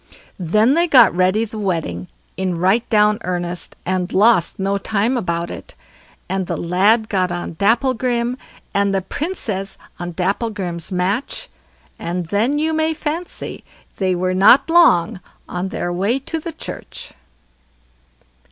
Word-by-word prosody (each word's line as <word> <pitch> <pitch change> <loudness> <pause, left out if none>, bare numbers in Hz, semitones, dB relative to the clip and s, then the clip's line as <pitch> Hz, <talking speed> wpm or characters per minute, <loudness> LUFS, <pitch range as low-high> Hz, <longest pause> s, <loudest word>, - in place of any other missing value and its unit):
Then 215 - +3
they 340 +3 +3
got 250 - +7
ready 185 +5 +2
the 220 0 -8
wedding 160 - -2 0.3
in 185 -2 -1
right 190 +7 +2
down 210 -1 +3
earnest, 175 -1 -3
and 185 0 -1
lost 205 -3 +3
no 195 +1 0
time 220 +5 0
about 170 -7 -2
it; - - -10 0.5
and 190 -1 -2
the - - -2
lad 200 +6 +2
got 185 -4 0
on 175 -1 -4
Dapplegrim, 240 +3 +1 0.4
and 200 0 +1
the 190 - 0
Princess 210 - -4 0.2
on 175 0 -5
Dapplegrim's 190 -2 -2
match, 200 - -1 0.5
and 175 +1 -3
then 230 +10 +1
you 315 +1 0
may 315 0 +1
fancy 320 +4 -5 0.3
they 185 -2 +1
were 185 +1 0
not 210 - +5
long 220 - +4 0.3
on 180 +1 -3
their 175 -2 -3
way 200 +8 +1
to 300 +4 -4
the 330 +1 -6
church. 315 - -8
200 Hz, 140 wpm, -19 LUFS, 180-235 Hz, 0.5 s, got